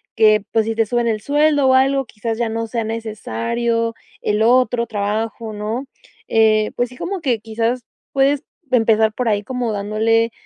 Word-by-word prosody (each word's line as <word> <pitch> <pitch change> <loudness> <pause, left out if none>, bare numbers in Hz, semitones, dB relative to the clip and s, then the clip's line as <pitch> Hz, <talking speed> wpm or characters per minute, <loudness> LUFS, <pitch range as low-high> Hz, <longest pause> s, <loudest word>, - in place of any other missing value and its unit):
que 215 -2 +5
pues 225 -1 +2
si 225 - -1
te 225 -1 +1
suben 240 0 0
el 215 -2 0
sueldo 290 0 +3
o - - +5
algo, 270 +1 +3
quizás 225 0 -4
ya 235 -2 0
no 225 +1 -2
sea 225 0 -2
necesario 230 - -2 0.3
el 210 +1 0
otro 240 -1 +3
trabajo, 220 +2 -3
¿no?, 215 +6 -3 0.4
eh, 215 -1 +3
pues 245 - 0
sí, 250 - -13
como 380 +2 -3
que 250 -6 0
quizás 230 +3 -2 0.3
puedes 275 +1 +2 0.3
empezar 220 -2 +3
por 250 +2 -2
ahí, 205 -1 0
como 250 -1 -2
dándole, 220 +3 +1
225 Hz, 170 wpm, -19 LUFS, 215-245 Hz, 0.4 s, que